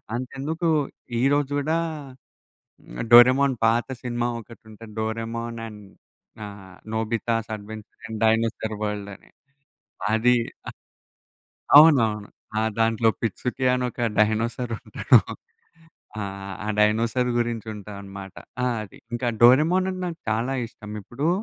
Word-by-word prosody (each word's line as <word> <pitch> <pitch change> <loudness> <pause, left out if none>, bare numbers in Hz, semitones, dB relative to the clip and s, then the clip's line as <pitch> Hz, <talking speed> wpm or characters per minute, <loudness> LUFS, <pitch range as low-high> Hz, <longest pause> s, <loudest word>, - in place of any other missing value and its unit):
అంతెందుకు 145 +7 -3 0.5
ఈరోజు 145 +1 +2
గూడా, 155 +3 0 1.0
హ్మ్ - - -8
'డోరేమోన్' 130 +2 +7
పాత 115 +1 +2 0.2
సినిమా 120 0 -1
ఒకటి 115 +1 -13
ఉంటది. 110 +1 -12
'డోరెమోన్ 115 +1 -3
అండ్' 105 -2 -11 0.6
ఆహ్, 95 -2 -11 0.2
'Nobita's 115 0 -1
adventure 105 +1 -11
and 110 - -5
dinosaur 110 0 +1
world' 105 -1 -3
అని. - - -20 0.8
అది 125 +3 +4 0.3
ఆహ్, - - -18 1.0
అవునవును. 115 -10 +5 0.3
ఆ! - - +1 0.2
దాంట్లో 115 0 +3
'పిట్సుటి' 125 +3 -1
అని 125 - -1
ఒక - - -15 0.2
డైనోసార్ 115 +3 +1
ఉంటాడు. - - +4 1.0
ఆ! - - -2 0.4
ఆ - - -4
డైనోసార్ 115 +4 +2
గురించి 115 -2 -2
ఉంటదనమాట. 100 -2 -9 0.3
ఆ! - - +2 0.2
అది. 100 - -13 0.2
ఇంకా 120 +1 -1
'డోరేమోన్' 155 +10 +5
అంటే 185 0 -6
నాకు 170 -1 -6
చాలా 115 +4 0
ఇష్టం. 105 -2 -12
ఇప్పుడు, 135 - -3
115 Hz, 120 wpm, -24 LUFS, 110-125 Hz, 1.0 s, డోరేమోన్